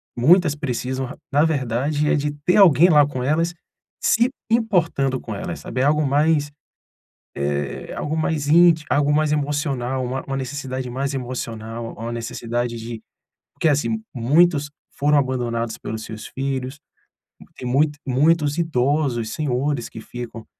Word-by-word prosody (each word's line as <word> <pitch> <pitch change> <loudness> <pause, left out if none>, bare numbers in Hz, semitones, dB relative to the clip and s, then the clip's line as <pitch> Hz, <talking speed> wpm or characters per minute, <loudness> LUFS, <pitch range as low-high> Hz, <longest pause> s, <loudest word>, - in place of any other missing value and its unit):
muitas 155 +5 +4
precisam, 130 -2 -3 0.2
na 145 +2 +4
verdade, 145 0 0
é - - +3
de 150 0 -1
ter 180 - +4
alguém 175 -4 +7
lá 150 -3 +6
com 135 -3 -5
elas 165 +5 +1 0.5
se 235 +2 +4 0.2
importando 170 - +1
com 110 - -6
elas, 85 -5 -5
sabe. 125 - -5
É - - +3
algo 150 +1 +3
mais, 145 +1 +2 0.9
eh, 70 0 -2
é - - -6
algo 155 +2 -3
mais 155 -2 -1
inti 165 0 +5
algo 145 0 +3
mais 155 0 +2
emocional, 140 -3 -1
uma 130 +2 -3
uma 135 - -3
necessidade 130 -1 -4
mais 135 +3 -2
emocional, 115 -3 -5
uma 115 +2 -6
necessidade 120 0 -3
de 115 0 -7 0.5
porque 165 - +1
assim, 155 +10 0
muitos 145 +4 +3 0.3
foram 145 +1 +3
abandonados 120 -4 -1
pelos 110 0 -5
seus 110 -1 -8
filhos, 135 0 -4 0.8
tem 125 - -5
muito 145 +3 +2
muitos 145 +3 +2
idosos, 140 -6 0
senhores 140 -3 -1
que - - -9
ficam 120 -1 -8
140 Hz, 145 wpm, -22 LUFS, 120-150 Hz, 0.9 s, alguém